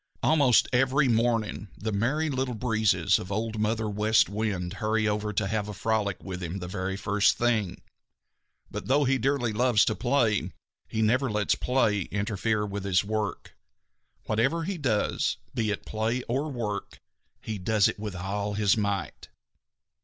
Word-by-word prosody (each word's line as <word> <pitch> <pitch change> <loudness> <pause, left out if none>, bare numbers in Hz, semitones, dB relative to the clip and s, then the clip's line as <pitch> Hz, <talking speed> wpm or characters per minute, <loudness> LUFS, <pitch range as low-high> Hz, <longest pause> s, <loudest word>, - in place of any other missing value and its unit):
Almost 140 -6 +4
every 135 +2 +3
morning 115 -3 0
the 110 +1 -3
Merry 140 +10 0
Little 130 -2 -2
Breezes 110 -7 +2
of 90 - -7
Old 110 +2 -2
Mother 110 +1 0
West 105 +2 +3
Wind 100 -4 -2
hurry 110 0 +1
over 105 0 -1
to 100 - 0
have 105 +1 -1
a 105 - -6
frolic 105 -2 -1
with 95 -1 -6
him 90 +2 -4
the 90 -2 -6
very 95 +1 -3
first 100 0 +2
thing. 110 -6 0 0.9
But - - -6
though 140 +3 +3
he 135 0 +2
dearly 125 -2 0
loves 120 -1 +3
to - - +1
play, 110 - +1 0.3
he 110 0 -1
never 130 +5 +2
lets 105 -1 +1
play 120 -5 +1
interfere 105 +1 -1
with 100 -3 0
work. 105 0 -3 0.7
Whatever 135 +10 +1
he 185 +1 -3
does, 115 -8 0 0.2
be 110 -2 0
it 105 - -3
play 110 +3 -1
or 135 +6 -2
work, 105 -6 -4 0.4
he 110 -2 -5
does 105 +2 +3
with 105 -3 -5
all 100 +3 -3
his 105 -2 +3
might. 100 -2 -3
110 Hz, 155 wpm, -27 LUFS, 100-120 Hz, 0.9 s, Almost